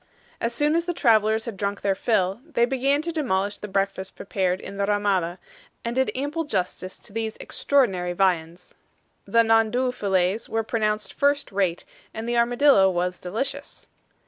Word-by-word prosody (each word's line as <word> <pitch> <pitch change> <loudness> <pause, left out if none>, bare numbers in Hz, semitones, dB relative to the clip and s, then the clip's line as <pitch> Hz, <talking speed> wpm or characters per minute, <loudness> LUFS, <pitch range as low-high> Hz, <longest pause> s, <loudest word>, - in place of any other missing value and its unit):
As 230 - 0
soon 295 +5 +1
as 335 +1 +1
the 350 -1 -2
travelers 220 -4 +3
had 230 -4 -5
drunk 200 +1 -3
their 195 - +2
fill, 195 0 0
they 295 -7 +1
began 275 +3 +1
to 335 - -2
demolish 205 - -1
the 210 - -6
breakfast 195 -1 -2
prepared 185 -2 -1
in 200 - -8
the 200 0 0
RAMADA, 195 -4 +1 0.5
and 235 - -1
did 265 0 +2
ample 290 +5 -2
justice 185 - -3
to - - -15
the 225 0 -2
extraordinary 190 -11 +1
viands. 175 -2 -1 0.5
The 230 0 +4
NANDOU 225 +3 +2
fillets 190 -1 0
were 225 0 0
pronounced 215 -1 -1
first 285 0 +1
rate, 190 -3 0 0.3
and 220 +1 -5
the 240 - 0
armadillo 240 -3 +5
was 180 0 -1
delicious. 270 +10 -5
215 Hz, 165 wpm, -24 LUFS, 190-255 Hz, 0.5 s, armadillo